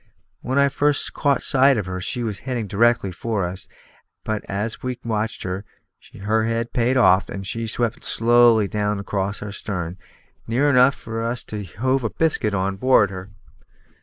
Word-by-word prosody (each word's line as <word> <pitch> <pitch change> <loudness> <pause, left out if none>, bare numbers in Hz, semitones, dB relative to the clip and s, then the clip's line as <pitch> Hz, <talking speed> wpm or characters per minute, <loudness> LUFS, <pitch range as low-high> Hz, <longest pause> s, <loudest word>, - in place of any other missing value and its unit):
When 130 +2 -2
I 140 0 +5
first 145 +1 +1
caught 140 -2 +1
sight 135 0 +4
of 105 - -2
her, 90 0 -5
she 120 +6 -3
was 105 -5 -3
heading 125 -3 -3
directly 110 -1 +2
for 100 +2 -2
us; 90 +2 -5 0.6
but 110 -1 -3
as 105 +3 -3
we 125 -1 -3
watched 110 -1 -2
her, 95 +1 -4 0.6
her 110 +2 +1
head 115 +1 -2
paid 125 +2 +2
off, 95 -6 +4
and 95 0 -6
she 115 +3 -4
swept 115 +1 -2
slowly 115 -2 +4
down 105 0 -1
across 100 +1 -3
our 105 - -6
stern, 90 -3 -5 0.5
near 135 +6 +2
enough 130 +1 +5
for 115 0 -6
us 120 +2 -3
to 105 -1 -6
have 90 - -13
hove 130 +4 +1
a 115 - 0
biscuit 110 -10 0
on 95 0 -1
board 110 -4 +4
her. 95 +1 -8
110 Hz, 180 wpm, -22 LUFS, 100-120 Hz, 0.6 s, I